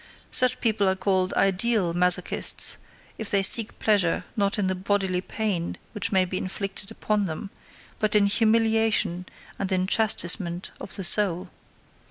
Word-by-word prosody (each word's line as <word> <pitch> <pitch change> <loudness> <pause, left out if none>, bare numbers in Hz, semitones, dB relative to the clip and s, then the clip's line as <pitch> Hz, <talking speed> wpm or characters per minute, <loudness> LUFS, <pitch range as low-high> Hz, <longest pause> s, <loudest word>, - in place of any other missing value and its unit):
Such 255 0 +2
people 215 -4 0
are 190 - 0
called 190 -1 -1
"ideal" 195 -1 +2
masochists, 180 0 +3 0.4
if 220 - -4
they 200 -1 +2
seek 220 +3 +4
pleasure 200 -6 0
not 200 -1 0
in 205 - -1
the 185 - -1
bodily 190 -1 -2
pain 195 -4 -4
which 210 -3 -3
may 190 -2 +2
be 185 +1 -5
inflicted 195 +1 -6
upon 215 -2 -2
them, 190 +4 -7 0.5
but 215 0 0
in 205 -1 +4
humiliation 220 -4 +1 0.3
and 195 0 -3
in 185 -1 0
chastisement 185 -4 +1
of - - -7
the 195 - -5
soul. 185 -1 +2
195 Hz, 150 wpm, -24 LUFS, 185-215 Hz, 0.5 s, seek